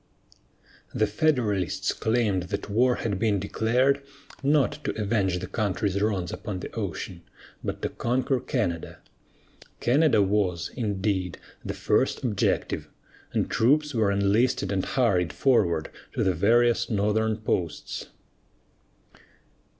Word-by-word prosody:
The 110 - +3
Federalists 105 - 0
claimed 105 -6 0
that 100 0 -4
war 125 +4 +3
had 100 -4 -2
been 105 -2 +2
declared, 125 +8 +1 0.4
not 145 +1 +2
to - - -3
avenge 100 -4 +1
the 90 - -4
country's 100 -1 -1
wrongs 95 -5 0
upon 100 -4 -5
the - - -6
ocean, 95 -4 -4 0.4
but - - -4
to - - 0
conquer 125 +2 0
Canada. 90 - -2 0.8
Canada 135 -3 +4
was, 95 -4 0
indeed, 100 -5 -1 0.3
the - - -4
first - - +1
objective, - - 0 0.4
and - - 0
troops 145 +5 +2
were 110 -4 +2
enlisted 100 +6 +2
and 95 -2 0
hurried 100 -10 +1
forward 95 - +2 0.2
to - - 0
the 95 - +2
various 120 +5 +3
northern 110 +1 +1
posts. 90 -7 -3
105 Hz, 120 wpm, -26 LUFS, 95-120 Hz, 0.8 s, Canada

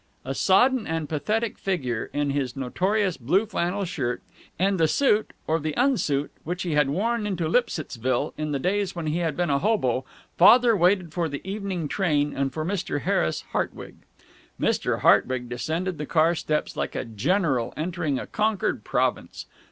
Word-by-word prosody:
A 135 - -2
sodden 245 - +3
and 160 -1 -2
pathetic 215 +9 -1
figure, 130 - -2
in 145 -1 0
his 135 -3 -2
notorious 185 +9 0
blue 170 - +2
flannel 195 -1 -1
shirt, 130 -8 -3 0.3
and 190 +2 +1
the 160 - +4
suit, 220 - +2
or 160 +1 +1
the 155 -1 -3
unsuit, 150 - +1
which 175 +3 -3
he 175 - -2
had 150 -2 +3
worn 210 +7 0
into 175 -5 -1
Lipsittsville 140 - 0
in 155 -1 -3
the 140 - 0
days 190 +5 -1
when 170 -2 -4
he 155 +2 0
had 165 -4 -1
been 175 -3 +1
a 140 - +2
hobo, 135 - +1 0.4
Father 235 +5 +7
waited 180 -2 +2
for 170 -1 -1
the 145 +5 -7
evening 195 -5 -3
train 150 -5 0
and 135 0 -1
for 155 0 -4
Mr. 175 -5 -2
Harris 80 - 0
Hartwig. - - -3 0.6
Mr. - - 0
Hartwig 125 -1 +3
descended 160 +7 -3
the 150 - -4
car 165 +1 +3
steps 155 -2 -2
like - - -3
a - - -2
general 130 - 0
entering 160 -3 -1
a - - -4
conquered 215 -1 -1
province. - - -1
165 Hz, 170 wpm, -25 LUFS, 145-195 Hz, 0.6 s, Father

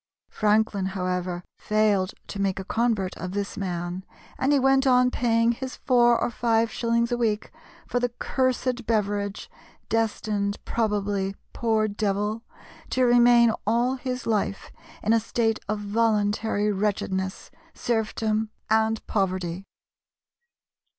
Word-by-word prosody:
Franklin, 210 -2 +1
however, 180 -1 -2 0.2
failed 210 -3 +1
to 200 - -5
make 195 -1 0
a - - -4
convert 220 -4 0
of 185 0 -5
this 200 0 -3
man, 180 -1 -4 0.4
and 270 - +2
he 290 - +5
went 270 0 +3
on 250 -1 +4
paying 230 -1 +2
his 255 +2 -5
four 240 -2 +3
or - - -1
five 230 -1 +1
shillings 235 0 0
a 240 - +1
week 220 -3 -1 0.3
for 245 - -1
the 245 0 0
"cursed 250 0 -1
beverage," 205 -2 -1 0.4
destined 215 -2 0
probably, 205 -3 -1 0.2
poor 220 -2 +1
devil, 210 +1 -1 0.5
to 255 0 +2
remain 240 -1 +6
all 240 +3 +2
his 255 -1 -4
life 210 -3 -1 0.3
in 215 - +3
a 230 - +4
state 225 0 0
of 215 - 0
voluntary 210 0 +1
wretchedness, 190 -2 -2 0.2
serfdom, 220 -1 -1 0.2
and 220 0 +2
poverty. 185 -2 -2
220 Hz, 125 wpm, -25 LUFS, 200-235 Hz, 0.5 s, remain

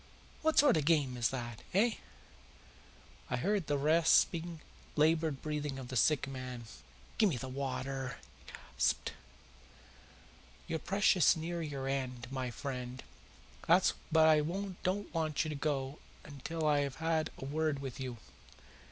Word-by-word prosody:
What 315 0 +1
sort 280 - +6
of - - +2
a - - -5
game 145 -6 +3
is 120 -1 +1
that 120 -3 -5
eh?" 225 +3 +3 1.3
I - - 0
heard 200 -5 0
the 145 - +1
rasping, 165 +2 +3 0.4
laboured 155 -1 +2
breathing 150 -2 -3
of 130 -2 -7
the 130 - -5
sick 135 +4 +3
man. 130 -3 -6 0.6
"Give 215 -3 +6
me 145 - -1
the 130 - -5
water!" 130 0 -3 0.3
he - - -10
gasped. - - -1 1.5
"You're 160 - -2
precious 190 -2 +4
near 170 +1 -3
your 140 -4 -4
end, 130 -2 -3
my 130 -2 -2
friend, 125 0 -5 0.6
but 175 +3 +5 0.2
I 160 -1 +6 0.4
don't 195 +1 -2
want 155 -3 0
you - - -3
to 150 - -3
go 140 -1 -2 0.5
till 165 -1 -2
I 150 -1 +4
have 140 -2 -1
had 160 -1 0
a - - -7
word 155 +1 0
with 135 -2 -6
you. 130 -3 -4
150 Hz, 145 wpm, -33 LUFS, 130-165 Hz, 1.5 s, sort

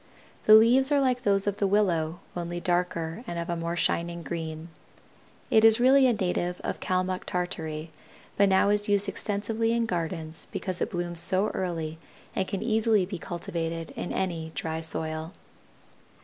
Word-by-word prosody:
The 215 - +9
leaves 250 +5 +6
are 290 - +4
like 255 -2 +1
those 200 -4 +1
of 205 -1 -2
the 200 - +2
willow, 175 -4 +1
only 175 0 -4
darker 175 +2 -1
and 170 - -4
of 170 0 -3
a - - -1
more 170 0 -3
shining 170 0 -1
green. 160 +1 -5 0.8
It 220 - +5
is 225 +1 +7
really 260 +2 +6
a 245 - +3
native 180 -3 -2
of - - -4
Calmuck 185 0 -1
Tartary 160 -3 -4 0.4
but 200 0 +4
now 190 +1 +4
is 205 0 +2
used 205 0 +2
extensively 215 +3 -1
in 235 0 +1
gardens 165 -4 -3
because 185 -2 -4
it - - 0
blooms 175 -1 -1
so 190 +4 +2
early 165 -3 -4 0.4
and 190 - -1
can 200 +2 -3
easily 220 -3 +2
be 185 -1 -6
cultivated 165 -1 -4
in - - -5
any 170 -4 -2
dry 160 0 -3
soil. 160 +1 -3
180 Hz, 165 wpm, -27 LUFS, 165-205 Hz, 0.8 s, The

